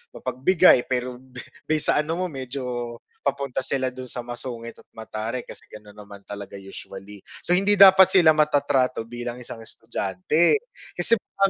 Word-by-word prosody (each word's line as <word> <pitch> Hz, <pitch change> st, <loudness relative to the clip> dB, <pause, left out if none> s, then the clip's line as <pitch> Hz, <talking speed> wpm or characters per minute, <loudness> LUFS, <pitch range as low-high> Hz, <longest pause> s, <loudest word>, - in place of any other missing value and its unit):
mapagbigay 160 Hz, 0 st, +3 dB
pero 125 Hz, -1 st, -3 dB
be 130 Hz, -1 st, -11 dB, 0.3 s
base 155 Hz, 0 st, +2 dB
sa -, -, +1 dB
ano 155 Hz, +2 st, -2 dB
mo 185 Hz, -, -2 dB
medyo, 125 Hz, -3 st, -5 dB, 0.3 s
papunta 140 Hz, -2 st, -3 dB
sila 130 Hz, -1 st, 0 dB
do'n 130 Hz, 0 st, -9 dB
sa 125 Hz, -, -3 dB
masungit 120 Hz, -1 st, -7 dB
at -, -, -18 dB
mataray, 110 Hz, +2 st, -5 dB
kasi -, -, -10 dB
gano'n 105 Hz, -1 st, -14 dB
naman 100 Hz, -1 st, -12 dB
talaga, 100 Hz, -1 st, -8 dB
usually. 95 Hz, +1 st, -11 dB, 0.2 s
So, 180 Hz, +1 st, +2 dB
hindi 200 Hz, +2 st, +3 dB
dapat 190 Hz, -1 st, +7 dB
sila 160 Hz, -4 st, +5 dB
matatrato 140 Hz, -5 st, +1 dB
bilang 120 Hz, 0 st, -6 dB
isang 120 Hz, -, -8 dB
estudyante, 115 Hz, -, 0 dB, 0.3 s
kasi 230 Hz, -, +4 dB
baka 195 Hz, -1 st, -1 dB
125 Hz, 155 wpm, -23 LUFS, 115-155 Hz, 0.3 s, dapat